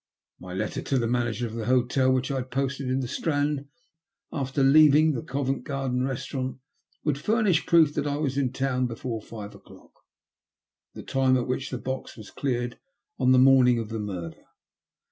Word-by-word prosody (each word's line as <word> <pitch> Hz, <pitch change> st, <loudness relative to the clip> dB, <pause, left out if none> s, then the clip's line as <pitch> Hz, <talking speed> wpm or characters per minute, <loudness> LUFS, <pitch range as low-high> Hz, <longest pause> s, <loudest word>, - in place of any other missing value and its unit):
My 90 Hz, 0 st, -8 dB
letter 105 Hz, +2 st, -3 dB
to 135 Hz, -, -1 dB
the 120 Hz, -, +1 dB
manager 120 Hz, -1 st, -1 dB
of 110 Hz, -, -6 dB
the 115 Hz, -1 st, -4 dB
hotel, 130 Hz, +1 st, +2 dB
which 130 Hz, +1 st, 0 dB
I 135 Hz, -, -1 dB
had 130 Hz, 0 st, -4 dB
posted 135 Hz, 0 st, -2 dB
in 130 Hz, +1 st, 0 dB
the 125 Hz, -, -3 dB
Strand 145 Hz, 0 st, -1 dB, 0.6 s
after 135 Hz, -1 st, -1 dB
leaving 155 Hz, +2 st, +6 dB
the 120 Hz, -, -3 dB
Go 140 Hz, +2 st, -3 dB
vent 135 Hz, -1 st, -2 dB
Garden 135 Hz, -3 st, -2 dB
restaurant, 130 Hz, 0 st, -3 dB, 0.5 s
would 145 Hz, -3 st, 0 dB
furnish 210 Hz, -3 st, +1 dB
proof 160 Hz, -3 st, +5 dB
that 150 Hz, 0 st, -1 dB
I 145 Hz, 0 st, -1 dB
was 140 Hz, -3 st, -1 dB
in 135 Hz, -3 st, 0 dB
town 130 Hz, -1 st, 0 dB
before 115 Hz, -1 st, -5 dB
five 105 Hz, -2 st, -9 dB
o'clock -, -, -17 dB, 0.5 s
— -, -, -67 dB
the -, -, -8 dB
time 130 Hz, -1 st, +2 dB
at 120 Hz, -, -1 dB
which 135 Hz, +1 st, -3 dB
the 130 Hz, -, -4 dB
box 130 Hz, +1 st, -5 dB
was 105 Hz, -2 st, -11 dB
cleared 120 Hz, -3 st, -3 dB, 0.4 s
on 130 Hz, -, +3 dB
the 130 Hz, -, +6 dB
morning 130 Hz, -2 st, +6 dB
of 115 Hz, -2 st, -4 dB
the 110 Hz, -1 st, -4 dB
murder. 90 Hz, -6 st, -6 dB
130 Hz, 190 wpm, -26 LUFS, 120-140 Hz, 0.6 s, leaving